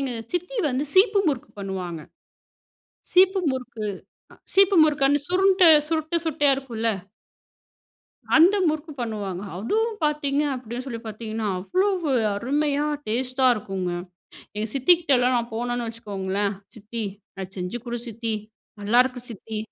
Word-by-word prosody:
எங்க 270 -3 -2 0.2
சித்தி 360 +8 -3
வந்து 260 +3 -1
சீப்பு 400 +2 +5
முறுக்கு 280 0 -3
பண்ணுவாங்க. 185 -4 -5 1.1
சீப்பு 380 +1 +5
முறுக்கு, 235 -4 -5 0.7
சீப்பு 390 0 +5
முறுக்கு 290 -3 +2
அந்த 290 +1 +3
சுருண்டு, 375 -1 +5 0.2
சுருட்ட 320 +1 -1
சுட்டையா 290 -3 +3
இருக்கும்ல 230 -4 -2 1.5
அந்த 355 +6 +6
முறுக்கு 310 0 -3
பண்ணுவாங்க, 205 -5 -4 0.2
அதுவும் 435 - 0
பார்த்தீங்க 295 -1 +1
அப்படின்னு 245 0 -6
சொல்லி 230 -3 -5
பார்த்தீங்கன்னா, 220 0 -4
அவ்வளவு 365 - 0 0.3
அருமையா 290 +5 0 0.2
டேஸ்ட்டா 255 +3 0
இருக்குங்க, 195 -4 -4 0.7
எங்க 215 +2 -1
சித்திகிட்டலாம் 270 -4 +4
நான் 235 0 -3
போனேன்னு 240 0 -2
வச்சுக்கோங்களேன், 200 -2 -3 0.2
"சித்தி! 220 +1 -6 0.3
அத 190 -1 -5
செஞ்சு 180 +6 -4
கொடு 240 0 -3
சித்தி. 230 0 -3 0.5
நல்லாருக்கு 245 +4 +2
சித்தி." 220 0 -7
250 Hz, 120 wpm, -24 LUFS, 220-310 Hz, 1.5 s, அந்த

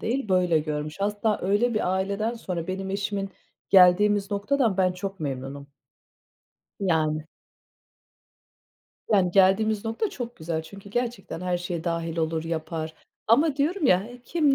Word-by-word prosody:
değil, 240 -1 -2
böyle 180 -3 +3
görmüş. 150 +3 -4
Hatta 205 +1 0
öyle 205 +6 +2
bir 185 -4 +1
aileden 200 +5 -1
sonra 180 -7 -4
benim 190 +1 -4
eşimin, 195 0 -2 0.4
geldiğimiz 200 +2 +5
noktadan 205 +1 +1
ben 185 -1 +3
çok 195 +1 -6
memnunum. 140 0 -5 1.1
Yani. 155 -4 +1 1.9
Yani, 190 -4 +4
geldiğimiz 200 +3 +3
nokta 225 - -1
çok 240 -2 -6
güzel. 160 0 -3
Çünkü 200 +4 -12
gerçekten, 235 -6 -3
her 180 -1 -1
şeye 175 -2 -4
dâhil 165 -1 -2
olur, 160 0 -1
yapar 160 -1 -4 0.3
ama 280 +6 +4
diyorum 310 +4 +1
ya, 190 0 +3 0.2
kim 300 -3 +2
195 Hz, 130 wpm, -26 LUFS, 165-215 Hz, 1.9 s, geldiğimiz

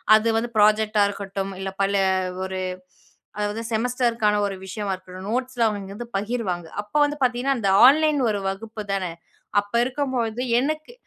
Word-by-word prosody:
அது 220 +1 +2
வந்து 235 +1 -1
ப்ராஜெக்ட் 215 +1 +4
டா 205 - +6
இருக்கட்டும், 195 -1 -4
இல்ல, 190 0 -3
பல 200 +1 +1 0.5
ஒரு 190 0 -4 0.8
அதாவது 210 +2 -2
செமஸ்டர் 240 +1 +1
க்கான 210 -1 +3
ஒரு 195 -1 -3
விஷயமா 200 +1 -4
இருக்கட்டும், 185 +1 -9
நோட்ஸ் 255 +1 -2
லாம் 230 - +5
அவங்க 205 -1 -4
இங்க 195 +1 -8
வந்து 240 +2 -7
பகிர்வாங்க. 200 -6 -2
அப்போ 210 +8 -4
வந்து 295 0 0
பாத்தீங்கன்னா, 250 +2 +1
அந்த 200 -3 +1 0.2
ஆன்லைன் 305 +1 +4
ஒரு 205 -1 0
வகுப்பு 215 +3 -5
தானே, 185 -3 -1 0.5
அப்போ 205 +3 -9
இருக்கும்பொழுது, 250 -4 -2 0.2
எனக்கு 310 - -2
215 Hz, 170 wpm, -23 LUFS, 195-245 Hz, 0.8 s, டா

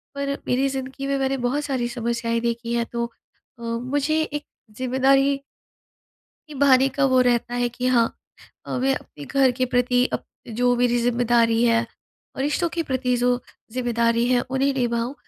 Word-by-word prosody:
पर 280 0 -2 0.2
मेरी 260 +2 +2
ज़िंदगी 270 +1 -5
में 275 0 0
मैंने 270 0 0
बहुत 290 +4 -1
सारी 255 -4 -1
समस्याएँ 235 -1 -1
देखी 235 0 -2
हैं 235 -1 +1
तो 235 0 -1 0.5
अ, - - -13
मुझे 275 +7 0
एक 295 -1 -3 0.3
ज़िम्मेदारी 270 +2 +2 1.1
निभाने 270 -2 +4
का 280 - +3
वो 255 - +5
रहता 240 0 +1
है 245 0 +1
कि 245 +1 -4
हाँ, 235 -3 +3 0.5
अ, - - -2
मैं 270 +1 +2
अपने 145 - -9
घर 270 - +3
के 255 - +3
प्रति 245 0 +3
अप - - -2 0.2
जो 245 +2 +1
मेरी 240 0 +2
ज़िम्मेदारी 235 -1 +2
है, 230 0 +3 0.5
रिश्तों 295 +5 0
के 330 0 -2
प्रति, 260 -3 0
जो 245 +1 +1 0.3
ज़िम्मेदारी 235 -1 +1
है, 250 -1 +3
उन्हें 270 +1 +1
निभाऊँ, 240 0 -1
250 Hz, 160 wpm, -23 LUFS, 235-270 Hz, 1.1 s, वो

